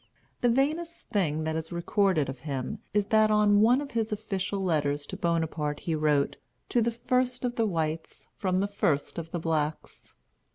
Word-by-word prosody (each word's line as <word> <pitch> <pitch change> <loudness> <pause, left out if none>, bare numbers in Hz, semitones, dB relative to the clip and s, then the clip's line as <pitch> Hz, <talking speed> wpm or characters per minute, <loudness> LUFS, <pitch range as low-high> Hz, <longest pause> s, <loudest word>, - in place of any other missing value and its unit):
The 245 - +3
vainest 310 +7 0
thing 160 -6 0
that 160 0 -1
is 160 0 -4
recorded 175 -2 +1
of 135 -1 -6
him 140 - -4
is 205 0 +2
that 215 0 +6
on 210 -1 +4
one 245 +5 +5
of 285 - -7
his 225 -2 -1
official 200 -2 -2
letters 145 -4 0
to - - -7
Bonaparte 160 -4 -1
he 165 - -2
wrote, 150 -2 +1 0.3
"To 240 - +2
the 230 - +2
First 250 +2 0
of 245 -1 -2
the 225 -2 +2
Whites, 160 -3 -3
from 185 -2 0
the 200 - +1
First 170 -6 0
of 165 -1 -7
the 175 - -3
Blacks." 155 -2 -3
185 Hz, 180 wpm, -28 LUFS, 155-220 Hz, 0.3 s, that